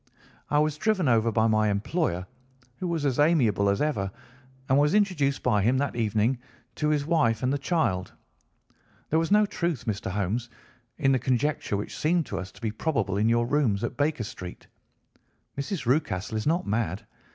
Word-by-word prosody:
"I 145 - +2
was 150 0 +2
driven 195 -4 +1
over 115 -1 +3
by 110 +1 +2
my 110 -1 +3
employer, 100 - -1 0.5
who 180 - -3
was 165 -4 -1
as 135 -2 0
amiable 120 - +3
as 100 +7 +1
ever, 105 -11 -1 0.6
and 135 +2 +4
was 150 +5 +3
introduced 170 -10 +1
by 105 -5 +2
him 120 +6 +2
that 140 +1 -1
evening 115 +2 +1 0.4
to 150 - +1
his 150 -2 +1
wife 120 -9 +2
and 130 +2 +2
the 145 - -1
child. 135 - 0 1.0
There 160 - +4
was 165 - -1
no 210 +1 +5
truth, 170 - -2
Mr. 100 -3 -2
Holmes, 105 +5 -2 0.5
in 135 -4 +2
the 130 - +3
conjecture 130 -2 0
which 105 - -5
seemed 165 +1 +2
to - - -4
us 95 +1 -7
to - - -17
be 110 -2 -1
probable 110 -5 -1
in 110 +2 +2
your 120 0 +2
rooms 120 -7 +1
at 120 - -3
Baker 145 -2 0
Street. 90 -4 -8 0.9
Mrs. 140 +1 -4
Rucastle 120 - 0
is 110 +3 -2
not 170 +3 +1
mad. 105 -1 -2
125 Hz, 185 wpm, -27 LUFS, 110-150 Hz, 1.0 s, no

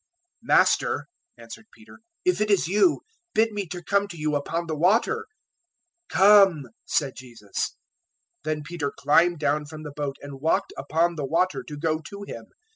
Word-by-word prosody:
014:028 - - -17
"Master," - - +3 0.3
answered 115 - -11
Peter, 225 +1 -17 0.3
"if 365 -10 +2
it 210 - +1
is 200 -5 +3
you, 210 - +3 0.3
bid 225 +1 +3
me 205 -3 -4 0.2
come 200 0 +2
to 175 -3 -10
you 150 -1 -1
upon 165 +4 -2
the 160 -2 -3
water." 230 - +2 0.8
014:029 - - -3
"Come," 195 -7 +6 0.2
said 140 -3 0
Jesus. 115 -6 -5 0.7
Then 155 -1 -2
Peter 150 -2 -3
climbed 170 +4 +3
down 150 0 0
from 155 +1 -9
the 150 -2 -8
boat 145 -2 -3
and 140 -1 -9
walked 175 +6 0
upon 165 +5 0
the 145 - -2
water 180 +5 +1
to 150 - -9
go 155 +1 0
to 200 +6 -9
Him. - - -8
160 Hz, 170 wpm, -25 LUFS, 145-200 Hz, 0.8 s, Come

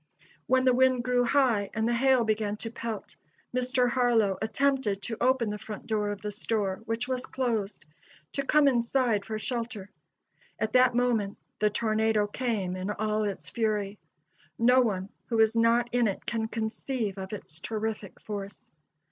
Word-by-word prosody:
When 260 0 +3
the 255 - +5
wind 255 -1 +3
grew 250 0 +2
high 235 -6 +2
and 220 +1 +1
the 240 - +1
hail 260 0 +4
began 215 -1 -1
to 225 +1 -4
pelt, 230 -3 -6 0.4
Mr. 255 0 +2
Harlow 240 -6 +2
attempted 220 -2 +1
to 225 0 -3
open 250 -4 +2
the 210 - -5
front 215 -1 -8
door 210 -2 0
of 205 -1 -5
the 210 - -3
store, 205 -2 -2
which 225 +2 -2
was 255 -1 -3
closed, 225 -9 -2 0.5
to 275 - -1
come 295 +1 +4
inside 235 -4 +2
for 220 -1 -3
shelter. 230 -4 -4 0.7
At 220 - -2
that 255 -1 +5
moment 230 -5 +1 0.2
the 210 - +3
tornado 215 0 +1
came 205 -5 -2
in 185 +2 -4
all 215 0 0
its 200 -2 -4
fury. 210 -3 -1 0.6
No 250 +2 +5
one 195 -5 -1 0.2
who 230 - -1
was 220 0 +4
not 230 +1 +3
in 245 -2 +3
it 195 - -4
can 220 -1 -1
conceive 220 -1 -3
of 190 0 -6
its 170 -6 -7
terrific 215 0 -4
force. 200 -2 -7
225 Hz, 165 wpm, -28 LUFS, 210-245 Hz, 0.7 s, the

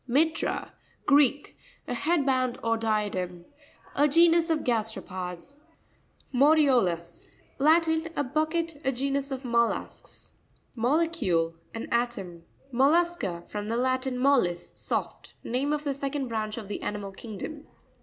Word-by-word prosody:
Mi'rra.—Greek. 285 -1 +1 0.3
A - - -2
head 300 +4 +1
band, 255 -2 +1
or 230 0 +2
diadem. 205 -6 -2 0.5
A 290 +2 +4
genus 335 +2 +4
of 320 -2 +1
gasteropods. 215 -1 -3 0.8
Monio'Lus.— 250 - +3 0.3
Latin. 320 +2 +3
A 290 - +1
bucket. 310 +3 -1
A 265 - +2
genus 275 +2 -1
of 265 -1 -5
mussels. 235 -1 -2 0.4
Mo'LEecuLe.—An 225 - 0
atom. 210 -8 -1 0.3
Mot.v'sca.—From 255 - +1
the 230 - 0
Latin, 255 +1 0
mollis, 250 -11 +2
soft. - - -4
Name 260 +5 -1
of 300 0 -1
the 285 -2 -1
second 275 -1 -3
branch 215 -1 -2
of 220 -3 -6
the 205 - -5
animal 205 -1 -4
kingdom. 235 +9 -8
255 Hz, 115 wpm, -27 LUFS, 215-295 Hz, 0.8 s, A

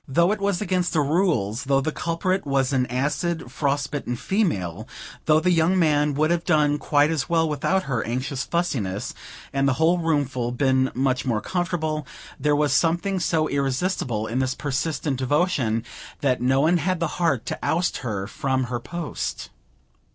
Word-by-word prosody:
Though 170 +7 +3
it 210 -1 -2
was 200 -2 0
against 180 -2 0
the 155 - +3
rules, 140 - +1
though 135 0 +3
the 155 +3 -1
culprit 180 +4 -1
was 135 -1 0
an 125 -1 +2
acid, 145 +3 -2
frost 140 0 -1
bitten 140 -4 -3
female, 110 - -1 0.4
though 155 0 +5
the 180 +3 +2
young 170 +2 +3
man 150 -4 +2
would 155 +3 +2
have 170 -1 +1
done 150 -3 +2
quite 145 +1 +3
as 145 -6 -2
well 165 -1 +3
without 185 +5 0
her 125 -5 -1
anxious 130 +3 -2
fussiness, 125 - -2 0.4
and 135 0 +2
the 140 - +3
whole 170 +3 +3
room 160 -4 +1
full 125 -2 -3
been 130 0 +2
much 130 0 +1
more 115 -4 0
comfortable, 160 - -2 0.3
there 145 +2 +2
was 150 0 +2
something 175 +4 +1
so 160 -3 +1
irresistible 135 - -1
in 115 +4 -2
this 130 -1 0
persistent 145 0 -2
devotion, 130 -5 +1 0.4
that 130 -4 +1
no 130 +2 +3
one 165 +4 +4
had 180 +2 -1
the 170 +1 -3
heart 140 -9 +1
to - - -4
oust 175 +2 0
her 105 -7 -3
from 130 +5 -1
her 120 -1 -3
post. 170 +6 -5
145 Hz, 175 wpm, -24 LUFS, 130-170 Hz, 0.4 s, though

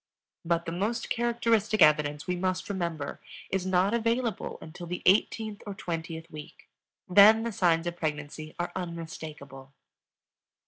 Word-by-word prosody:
_ - - -64 0.4
But 170 0 0
the 165 - -3
most 205 +7 -2
characteristic 230 -2 +1
evidence, 150 -1 +3
we 180 - -1
must 185 +1 -2
remember, 170 -7 -3 0.3
is 190 -1 -1
not 185 +3 +2
available 230 -2 -1
until 170 +2 -9
the 180 +1 -5
eighteenth 210 +2 +2
or 200 - -5
twentieth 165 -3 -5
week; 150 -1 -11 0.4
then 210 +4 +7
the 235 - -2
signs 170 -4 +2
of 175 0 -3
pregnancy 155 -1 -4
are 175 - -2
unmistakable. 155 -6 -7
175 Hz, 140 wpm, -28 LUFS, 160-205 Hz, 0.4 s, then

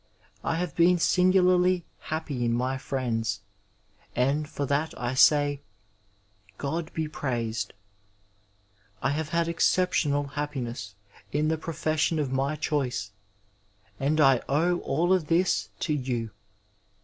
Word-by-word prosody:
I 165 - 0
have 170 -2 -3
been 175 +1 +5
singularly 180 0 +3
happy 155 -5 -3
in 115 0 +1
my 130 +2 -1
friends, 115 -6 -2 0.7
and 140 +5 +1
for 145 - -3
that 145 +4 -1
I 120 +1 -2
say 145 +1 +4 0.5
" 105 +1 -33
God 160 +3 -3
be 160 -1 -1
praised." 115 -8 -3 1.3
I 135 - +2
have 155 +1 -2
had 170 +1 +1
exceptional 165 -4 +1
happiness 130 -8 -4 0.4
in 150 +2 +1
the 160 - +1
profession 160 0 0
of 145 -4 -1
my 135 +3 0
choice, 135 -8 -2 0.9
and 150 +3 +1
I 135 -4 +5
owe 170 +5 +2
all 170 +7 +1
of 180 -5 +1
this 170 +3 +2
to 155 - 0
you. 125 -5 -2
145 Hz, 125 wpm, -27 LUFS, 125-165 Hz, 1.3 s, been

